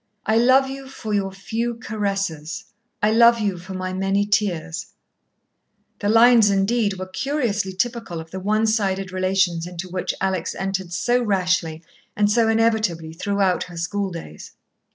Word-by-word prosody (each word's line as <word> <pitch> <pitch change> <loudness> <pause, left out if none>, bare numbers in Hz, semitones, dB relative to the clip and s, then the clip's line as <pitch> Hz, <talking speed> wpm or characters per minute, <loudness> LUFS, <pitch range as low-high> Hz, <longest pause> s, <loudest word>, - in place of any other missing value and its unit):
"I 220 - +2
love 260 +3 +5
you 270 0 -7
for 220 -5 -6
your 195 -2 0
few 225 +5 -3
caresses, 195 -9 -3 0.4
I 210 - +4
love 235 +1 +6
you 200 -4 -1
for 185 +2 -8
my 185 0 -3
many 195 +2 +1
tears" 185 -6 -1 1.1
The 205 - -1
lines, 225 -1 +6
indeed, 200 +1 +1
were 185 - -4
curiously 210 -1 -1
typical 225 -3 -2
of 160 0 -10
the 190 - -5
one 215 +3 +1
sided 195 -4 0
relations 185 -2 +1
into 180 +1 -6
which 180 0 -3
Alex 190 -3 -1
entered 190 -2 -3
so 240 +7 +1
rashly 180 -6 0 0.3
and 205 0 +2
so 230 +1 +3
inevitably 220 -8 +1
throughout 195 +1 0
her 175 -1 -11
schooldays. 170 - -5
195 Hz, 150 wpm, -22 LUFS, 185-220 Hz, 1.1 s, love